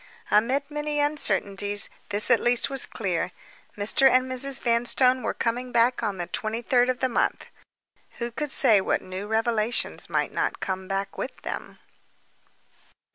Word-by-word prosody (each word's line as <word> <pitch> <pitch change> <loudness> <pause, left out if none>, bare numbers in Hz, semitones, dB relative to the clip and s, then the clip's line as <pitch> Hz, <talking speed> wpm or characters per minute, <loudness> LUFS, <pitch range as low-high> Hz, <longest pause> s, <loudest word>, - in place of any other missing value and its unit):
Amid 265 +7 +2
many 295 0 -2
uncertainties, 205 -8 0 0.2
this 205 +1 +3
at - - +6
least 240 +3 +2
was 270 -2 +3
clear, 185 -4 -2 0.5
Mr. 215 +6 +4
and 255 0 +3
Mrs. 265 +1 +1
Vanstone 245 +2 +2
were - - -2
coming 245 +2 -2
back 240 +1 +2
on 205 -4 -2
the 175 - -3
twenty 220 +5 -4
third 245 +1 +3
of 255 0 -2
the 260 - +3
month. 240 - -1 0.7
Who 235 0 -3
could 295 +5 -4
say 230 -7 +4
what - - -1
new 185 +2 -6
revelations 225 +1 -1
might - - 0
not - - -1
come 190 0 -4
back 195 0 -3
with 260 - -5
them? - - -6
235 Hz, 155 wpm, -25 LUFS, 205-255 Hz, 0.7 s, at